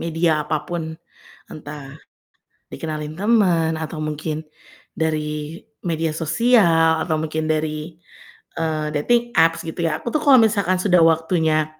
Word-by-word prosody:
media 165 Hz, -2 st, 0 dB
apapun 160 Hz, +1 st, -4 dB, 0.6 s
entah 145 Hz, -2 st, -9 dB, 0.8 s
dikenalin 155 Hz, -1 st, -5 dB
temen 185 Hz, -7 st, +2 dB
atau 160 Hz, 0 st, -5 dB
mungkin 155 Hz, +1 st, -4 dB, 0.5 s
dari 155 Hz, 0 st, -2 dB, 0.3 s
media 165 Hz, -2 st, -1 dB
sosial 165 Hz, -2 st, +3 dB
atau 160 Hz, -1 st, -1 dB
mungkin 155 Hz, 0 st, -3 dB
dari, 155 Hz, +1 st, -3 dB, 0.6 s
eee, 155 Hz, -2 st, -1 dB
dating 240 Hz, +11 st, +1 dB
apps 165 Hz, 0 st, +3 dB
gitu 160 Hz, +2 st, -6 dB
ya. 155 Hz, -1 st, -1 dB
Aku -, -, -3 dB
tuh 305 Hz, -, +2 dB
kalau 280 Hz, -3 st, +7 dB
misalkan 200 Hz, -4 st, +2 dB
sudah 180 Hz, -2 st, +3 dB
waktunya 160 Hz, -1 st, +2 dB
160 Hz, 120 wpm, -21 LUFS, 155-175 Hz, 0.8 s, kalau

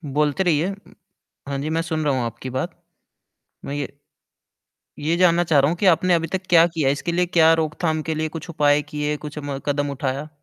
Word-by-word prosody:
बोलते 150 Hz, +5 st, +2 dB
रहिए। 165 Hz, -2 st, +2 dB
उ 200 Hz, +1 st, -13 dB, 0.6 s
हाँ 140 Hz, -1 st, -3 dB
जी, 145 Hz, +3 st, -3 dB
मैं 165 Hz, +1 st, 0 dB
सुन 160 Hz, -1 st, -2 dB
रहा 140 Hz, -, +2 dB
हूँ 130 Hz, -2 st, 0 dB
आपकी 115 Hz, +3 st, -6 dB
बात। 130 Hz, +1 st, -4 dB, 0.9 s
मैं 140 Hz, -, -4 dB
ये 145 Hz, -2 st, -3 dB, 1.1 s
ये 155 Hz, +3 st, 0 dB
जानना 175 Hz, -1 st, +4 dB
चाह 155 Hz, -4 st, +3 dB
रहा 140 Hz, -, +3 dB
हूँ 170 Hz, -, -2 dB
कि 200 Hz, -, -1 dB
आपने 180 Hz, +2 st, +1 dB
अभी 165 Hz, -1 st, +1 dB
तक 185 Hz, -, -2 dB
क्या 170 Hz, -1 st, +7 dB
किया? 160 Hz, -5 st, 0 dB
इसके 145 Hz, +5 st, -1 dB
लिए 180 Hz, +1 st, +1 dB
क्या 165 Hz, -2 st, +5 dB
रोकथाम 155 Hz, 0 st, -1 dB
के 160 Hz, -, 0 dB
लिए 155 Hz, 0 st, -2 dB
कुछ 165 Hz, -, -9 dB
उपाय 150 Hz, -3 st, +3 dB
किए, 150 Hz, 0 st, -3 dB
कुछ 150 Hz, 0 st, -9 dB
म 140 Hz, -1 st, -4 dB
कदम 145 Hz, 0 st, 0 dB
उठाया? 140 Hz, +2 st, -3 dB
155 Hz, 215 wpm, -22 LUFS, 145-165 Hz, 1.1 s, क्या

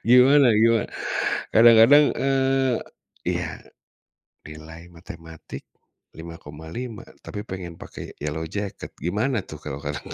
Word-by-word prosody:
Gimana 130 Hz, +2 st, +6 dB
gimana, 115 Hz, 0 st, +3 dB, 0.6 s
kadang-kadang, 115 Hz, +6 st, +7 dB
eee, 135 Hz, -1 st, +1 dB, 0.5 s
iya, -, -, -3 dB, 0.9 s
nilai 80 Hz, +2 st, -11 dB
matematik 80 Hz, -1 st, -11 dB, 0.5 s
5,5, 85 Hz, +8 st, -8 dB, 0.2 s
tapi 105 Hz, -1 st, -7 dB
pengen 90 Hz, -5 st, -7 dB
pakai -, -, -10 dB
yellow 80 Hz, +2 st, -3 dB
jacket 100 Hz, +3 st, -6 dB
gimana 105 Hz, -, -1 dB
tuh 75 Hz, -4 st, -10 dB
kalau 70 Hz, -1 st, -7 dB
kata 75 Hz, -1 st, -4 dB
100 Hz, 100 wpm, -23 LUFS, 80-125 Hz, 0.9 s, kadang-kadang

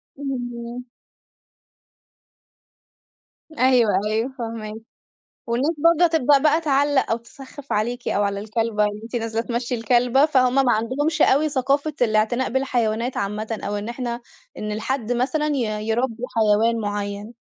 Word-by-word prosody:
اهم. 245 Hz, -3 st, -5 dB, 2.7 s
أيوه، 255 Hz, -6 st, +3 dB, 0.2 s
أيوه، 220 Hz, +4 st, -1 dB
فاهماكِ. 225 Hz, -2 st, -5 dB, 0.7 s
والناس 250 Hz, +7 st, +1 dB
برضه 335 Hz, +1 st, +6 dB
تبدأ 295 Hz, -4 st, +4 dB
بقى 305 Hz, +3 st, +3 dB
تعلّق 285 Hz, -3 st, +2 dB
أو 225 Hz, -, +2 dB
تسخّف 270 Hz, +4 st, -11 dB
عليكِ 240 Hz, +4 st, -1 dB
أو 205 Hz, -, +1 dB
على 200 Hz, 0 st, -1 dB
الكلبة 220 Hz, 0 st, 0 dB
اللي 210 Hz, 0 st, -2 dB
أنتِ 235 Hz, +2 st, -5 dB
نازلة 225 Hz, -1 st, -2 dB
تمشي 240 Hz, +1 st, -3 dB
الكلبة، 245 Hz, +4 st, +3 dB
فهُم 255 Hz, -4 st, +2 dB
ما 265 Hz, -3 st, +4 dB
عندهمش 270 Hz, +8 st, 0 dB
أوي 300 Hz, +3 st, +4 dB
ثقافة 280 Hz, +2 st, 0 dB
الاعتناء 225 Hz, +3 st, +1 dB
بالحيوانات 245 Hz, -2 st, 0 dB
عامةً 210 Hz, +2 st, -3 dB
أو 205 Hz, +1 st, -2 dB
إن 205 Hz, +2 st, -5 dB
إحنا 240 Hz, 0 st, -4 dB, 0.4 s
إن 210 Hz, 0 st, -4 dB
الحد 235 Hz, +2 st, -2 dB
مثلًا 290 Hz, +5 st, 0 dB
ي 220 Hz, -7 st, -1 dB
يربّي 235 Hz, +1 st, -1 dB
حيوان 225 Hz, +1 st, +3 dB
مُعيّن. 205 Hz, +1 st, -4 dB
240 Hz, 130 wpm, -22 LUFS, 220-270 Hz, 2.7 s, برضه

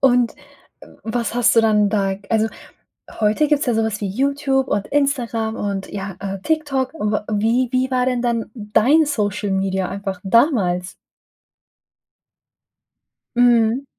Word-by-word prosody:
Und, 250 Hz, -3 st, +3 dB, 0.7 s
was 230 Hz, +1 st, -2 dB
hast 245 Hz, -1 st, +3 dB
du -, -, +8 dB
dann 210 Hz, -2 st, +3 dB
da 200 Hz, -2 st, 0 dB
Also, 220 Hz, -1 st, +2 dB, 0.7 s
heute 215 Hz, +8 st, +2 dB
gibt's 295 Hz, -1 st, +1 dB
ja 245 Hz, -, +1 dB
so 225 Hz, 0 st, +1 dB
was 215 Hz, -2 st, -3 dB
wie 200 Hz, -, -2 dB
YouTube, 270 Hz, +4 st, 0 dB
und 200 Hz, -1 st, -1 dB
Instagram, 240 Hz, -6 st, 0 dB
und, 200 Hz, -1 st, -3 dB
ja, 195 Hz, -2 st, -6 dB
äh, 195 Hz, -1 st, -5 dB
TikTok. 290 Hz, -4 st, -1 dB
Und 210 Hz, -8 st, -2 dB, 0.2 s
wie 230 Hz, +4 st, +1 dB
wie 255 Hz, 0 st, +2 dB
wie -, -, -23 dB
war 250 Hz, -1 st, +2 dB
denn 250 Hz, -2 st, 0 dB
dann 235 Hz, -2 st, -1 dB
dein 230 Hz, +8 st, +3 dB
Social 210 Hz, -6 st, -1 dB
Media 190 Hz, -1 st, -1 dB
einfach 195 Hz, -2 st, -5 dB
damals? 190 Hz, -, +2 dB, 2.4 s
Mhm. 240 Hz, +1 st, +3 dB
225 Hz, 140 wpm, -20 LUFS, 205-260 Hz, 2.4 s, du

